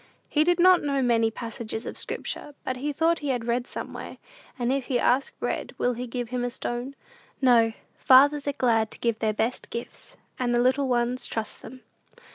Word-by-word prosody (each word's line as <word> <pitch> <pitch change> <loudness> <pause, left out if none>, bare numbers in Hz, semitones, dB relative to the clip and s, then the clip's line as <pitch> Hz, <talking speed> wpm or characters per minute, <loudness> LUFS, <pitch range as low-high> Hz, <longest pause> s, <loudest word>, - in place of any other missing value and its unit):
He 305 - +3
did 350 +1 +2
not 365 0 +6
know 280 -2 0
many 230 -2 +3
passages 225 0 -6
of - - -5
Scripture, 295 - -5
but 255 - -2 0.2
thought 330 +2 +2
he 290 - -5
had 245 -3 -1
read 240 +1 -1
somewhere, - - -7 0.4
"And 245 0 0
if 275 -2 -1
he 255 - 0
ask 255 +3 +1
bread, - - -3
will 245 - +1
he 245 +1 -5
give 240 -1 -4
him 250 0 -2
a 245 - 0
stone?" 245 +2 -5 0.4
No; 235 -4 +4 0.3
fathers 285 +2 +5
are 285 - +1
glad 225 -5 +2
to - - -7
give 230 -2 -1
their 220 -1 +1
"best 225 +4 -2
gifts," 240 - -7 0.2
and 240 -1 +1
the - - +3
little 260 +3 +2
ones 245 0 0
trust 220 -1 -4
them. 255 +2 -11
245 Hz, 195 wpm, -26 LUFS, 235-275 Hz, 0.4 s, not